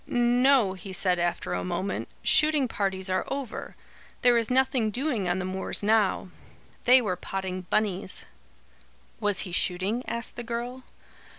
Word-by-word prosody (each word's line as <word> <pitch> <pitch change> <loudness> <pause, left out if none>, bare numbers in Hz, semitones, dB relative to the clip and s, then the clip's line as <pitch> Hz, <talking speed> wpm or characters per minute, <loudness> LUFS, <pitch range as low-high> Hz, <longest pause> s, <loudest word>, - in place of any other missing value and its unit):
"No," 245 -2 +3
he 190 +1 -9
said 180 -1 +3
after 175 0 -1
a - - -2
moment, 180 +2 -3 0.2
"shooting 305 -3 +3
parties 190 -4 -2
are 185 0 0
over. 275 -4 -5 0.5
There 245 -1 +6
is 230 -1 +1
nothing 255 -3 +2
doing 240 -5 -1
on 175 - +1
the 185 - -3
moors 190 +2 -2
now. 210 -3 +2 0.6
They 250 +1 +7
were 185 -4 -1
potting 185 0 -5
bunnies." 200 -3 0 0.9
"Was 205 -3 +1
he 185 - -5
shooting?" 190 +7 -1
asked 235 +1 -2
the 240 - -4
girl. 240 +2 -4
210 Hz, 150 wpm, -27 LUFS, 185-245 Hz, 0.9 s, They